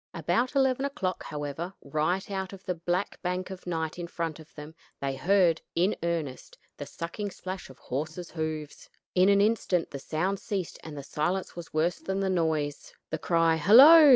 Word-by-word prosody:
About 250 +3 0
eleven 265 -1 +3
o'clock, 195 -10 -2
however, 150 +5 -5
right 155 +8 -1
out 190 -1 -3
of 195 -1 -11
the 180 - 0
black 175 +3 -2
bank 180 +1 -2
of 185 -1 -9
night 160 -1 -2
in 175 - -4
front 165 -2 -4
of 160 0 -14
them 150 +1 -9 0.3
they 135 -1 -2
heard, 175 +2 +3
in 180 +5 +2
earnest, 165 -6 -3 0.2
the 145 - -6
sucking 170 +7 -5
splash 185 -2 -7
of 130 - -13
horses' 160 +6 -5
hoofs. 155 -2 -5 0.2
In 185 +2 +5
an 200 0 +5
instant 205 -5 +1
the 140 - -5
sound 180 +8 -1
ceased 190 -4 -4
and 155 -2 -8
the 140 - -6
silence 175 +7 -2
was 170 -1 -8
worse 160 +3 +1
than 190 0 -2
the 195 -1 +1
noise. 155 -5 -1 0.2
The - - -2
cry 165 -1 +3
"Hollo!" 280 - +9
175 Hz, 180 wpm, -28 LUFS, 155-190 Hz, 0.3 s, Hollo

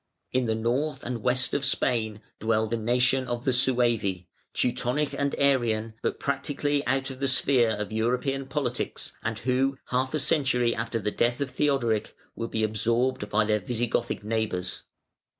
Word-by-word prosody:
In 130 -1 +1
the 110 - +1
north 130 +6 -1
and 120 -2 -4
west 125 +1 +2
of 140 - 0
Spain 110 -6 +1 0.2
dwell 110 0 +2
the 115 +2 -1
nation 125 +3 +2
of 120 0 -3
the 130 - +3
Suevi, 120 -8 +1 0.2
Teutonic 125 +4 0
and 140 0 -1
Arian, 115 -5 +2
but - - -2
practically 145 +1 -1
out 135 +1 0
of 130 - -9
the 135 - +1
sphere 130 -2 +4
of 105 -1 -3
European 125 +5 0
politics, 135 -4 -3
and 115 -1 -2
who, 130 +3 +1
half 130 +3 0
a - - +1
century 130 -5 +2
after 115 +1 -2
the 105 -1 -2
death 120 +3 +1
of 140 -2 -2
Theodoric, 125 -8 0 0.2
will 115 - -3
be 110 -1 -1
absorbed 115 +1 0
by 105 +1 +2
their 105 0 +2
Visigothic 120 +2 -2
neighbours. 105 -4 -2
120 Hz, 165 wpm, -27 LUFS, 110-135 Hz, 0.2 s, sphere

